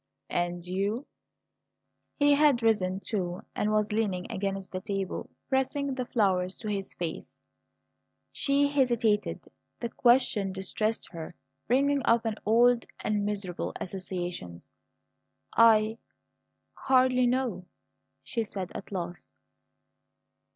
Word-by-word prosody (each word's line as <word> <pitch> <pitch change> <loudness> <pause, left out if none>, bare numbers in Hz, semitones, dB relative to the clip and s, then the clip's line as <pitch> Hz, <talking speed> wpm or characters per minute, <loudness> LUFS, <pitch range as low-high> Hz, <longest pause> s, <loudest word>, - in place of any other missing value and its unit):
"And 175 0 -1
you?" 200 +8 -1 1.1
He 290 -1 +5
had 285 -5 +4
risen 195 -4 +2
too, 180 -4 -3
and 210 - 0
was 215 0 +1
leaning 205 -2 -1
against 195 -2 -3
the 185 - -3
table, 195 -1 -3 0.2
pressing 270 +1 0
the 255 -2 -3
flowers 185 -5 +1
to 215 - -5
his 195 -2 -3
face. 165 -2 -6 0.9
She 280 0 +2
hesitated. 240 -7 +1 0.3
The 235 - -3
question 240 -6 +3
distressed 215 +4 -2
her, 165 -1 -7 0.3
bringing 275 +3 +3
up 230 -3 +3 0.2
old 235 +2 +4
and 205 -1 0
miserable 195 -4 -3
associations. 175 - -5 0.9
"I 220 -1 +5 0.7
hardly 255 -1 +3
know," 245 -7 -1 0.6
she 230 - -2
said 190 -4 -6
at 200 - -8
last. 175 -3 -5
210 Hz, 110 wpm, -29 LUFS, 185-245 Hz, 1.1 s, He